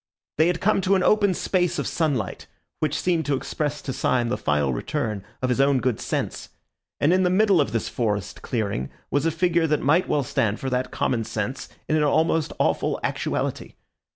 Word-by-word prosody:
They 160 Hz, -, +5 dB
had 175 Hz, -1 st, 0 dB
come 195 Hz, 0 st, +3 dB
to 195 Hz, +1 st, +3 dB
an 185 Hz, -, +2 dB
open 205 Hz, -3 st, +3 dB
space 180 Hz, -1 st, 0 dB
of -, -, -2 dB
sunlight, 140 Hz, -, -1 dB, 0.3 s
which 155 Hz, -1 st, 0 dB
seemed 170 Hz, -5 st, 0 dB
to 145 Hz, -, +2 dB
express 145 Hz, +2 st, -3 dB
to 130 Hz, -, -3 dB
Syme 125 Hz, -2 st, +1 dB
the 125 Hz, -, 0 dB
final 75 Hz, -3 st, +1 dB
return 110 Hz, -, -3 dB, 0.2 s
of 130 Hz, -, +1 dB
his 125 Hz, +2 st, +2 dB
own 140 Hz, -1 st, +3 dB
good 125 Hz, -4 st, 0 dB
sense; -, -, -3 dB, 0.5 s
and 155 Hz, +5 st, +3 dB
in 185 Hz, -, +3 dB
the 180 Hz, -, +3 dB
middle 195 Hz, -2 st, +4 dB
of 140 Hz, -, -1 dB
this 115 Hz, -1 st, -1 dB
forest 105 Hz, -5 st, -2 dB
clearing 100 Hz, -, -2 dB, 0.2 s
was 145 Hz, +3 st, +1 dB
a -, -, +4 dB
figure 170 Hz, 0 st, +1 dB
that 150 Hz, -1 st, +1 dB
might 160 Hz, +7 st, +3 dB
well 145 Hz, -, +2 dB
stand 115 Hz, -4 st, 0 dB
for 130 Hz, -, -3 dB
that 125 Hz, 0 st, 0 dB
common 115 Hz, -3 st, -1 dB
sense 110 Hz, +5 st, -4 dB, 0.2 s
in 155 Hz, -, +1 dB
an 150 Hz, -, +2 dB
almost 160 Hz, +1 st, +2 dB
awful -, -, +1 dB
actuality. -, -, -2 dB
145 Hz, 200 wpm, -24 LUFS, 120-170 Hz, 0.5 s, They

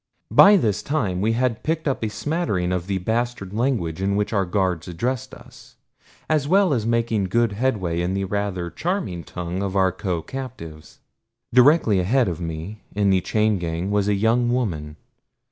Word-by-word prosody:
By 205 Hz, +1 st, +8 dB
this 105 Hz, -, 0 dB
time 100 Hz, -12 st, -1 dB
we 110 Hz, +2 st, +2 dB
had 120 Hz, -1 st, 0 dB
picked 160 Hz, 0 st, -2 dB
up 135 Hz, -4 st, -1 dB
a 110 Hz, -, 0 dB
smattering 105 Hz, -, -1 dB
of 90 Hz, -1 st, -2 dB
the 100 Hz, -1 st, -1 dB
bastard 110 Hz, 0 st, -2 dB
language 105 Hz, -8 st, -1 dB
in 100 Hz, +1 st, 0 dB
which 105 Hz, +2 st, -1 dB
our 100 Hz, -2 st, +2 dB
guards 90 Hz, -3 st, -1 dB
addressed 120 Hz, +9 st, -3 dB
us, -, -, -16 dB, 0.5 s
as 150 Hz, -3 st, +1 dB
well 190 Hz, -1 st, +4 dB
as 115 Hz, -4 st, -1 dB
making 115 Hz, -3 st, +1 dB
good 115 Hz, +4 st, +1 dB
headway 100 Hz, -7 st, -1 dB
in 90 Hz, +2 st, -1 dB
the 100 Hz, -, -1 dB
rather 95 Hz, -3 st, -3 dB
charming 165 Hz, -, -3 dB
tongue 90 Hz, +1 st, -5 dB
of 100 Hz, -1 st, -3 dB
our 95 Hz, -1 st, +3 dB
co 90 Hz, -3 st, -3 dB
captives. 115 Hz, -, -9 dB, 0.5 s
Directly 125 Hz, -, +5 dB
ahead 120 Hz, +7 st, +2 dB
of 85 Hz, -1 st, -4 dB
me 80 Hz, +6 st, -6 dB
in 100 Hz, -1 st, +2 dB
the 95 Hz, -1 st, +3 dB
chain 105 Hz, -1 st, +1 dB
gang 85 Hz, +3 st, -3 dB
was 105 Hz, -1 st, +1 dB
a 105 Hz, -, +2 dB
young 115 Hz, +4 st, +2 dB
woman. 80 Hz, -12 st, -2 dB
100 Hz, 180 wpm, -23 LUFS, 90-120 Hz, 0.5 s, By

